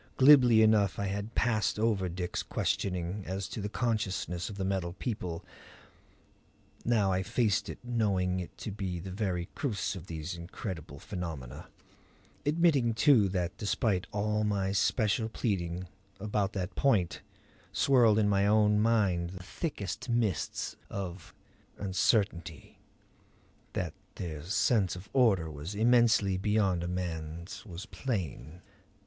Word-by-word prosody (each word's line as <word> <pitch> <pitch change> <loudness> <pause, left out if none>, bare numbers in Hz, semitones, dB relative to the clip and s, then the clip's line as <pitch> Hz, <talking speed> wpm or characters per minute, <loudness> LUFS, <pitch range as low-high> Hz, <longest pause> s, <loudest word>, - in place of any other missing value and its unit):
Glibly 130 -5 +7
enough 105 -3 +4
I 100 - -1
had 100 +3 -4
passed 110 -4 +1
over 105 -4 +1
Dick's 90 0 -3
questioning 90 +1 -2
as 95 +1 -3
to 110 - -5
the 105 - -3
consciousness 100 -7 -1
of 100 - -8
the 95 - -2
Metal 95 -3 -1
People; 90 -6 -4 1.4
now 110 -5 +2
I 95 0 +1
faced 105 +1 +1
it - - -6
knowing 100 -7 0
it 90 - -7
to 110 - -5
be 95 -3 -3
the 95 +2 -7
very 90 -3 -2
crux 110 -7 -2
of 90 -1 -9
these 80 +1 -5
incredible 85 -3 -7
phenomena; 80 - -6 0.8
admitting, 145 -7 +3
too, 115 -5 +5
that 90 0 -2
despite 100 -2 0
all 105 +1 0
my 100 -2 0
special 110 +2 +1
pleading, 90 -5 -2 0.3
about 105 -1 -1
that 95 -1 -3
point 105 -11 +1 0.5
swirled 120 -6 +4
in 105 -1 +3
my 100 0 +3
own 105 0 +4
mind 100 -6 +2
the 90 0 -9
thickest 105 - -4
mists 115 -8 -1
of 95 -3 -6 0.5
uncertainty. 95 - 0 0.9
That - - -2 0.2
their 80 -4 -5
sense 95 +2 +2
of 90 +2 -10
order 100 -11 +3
was 75 +7 -6
immensely 110 -4 +4
beyond 100 -3 +1
a - - -2
man's 85 -1 -5
was 90 +3 -7
plain. 90 - -4
100 Hz, 130 wpm, -30 LUFS, 90-110 Hz, 1.4 s, Glibly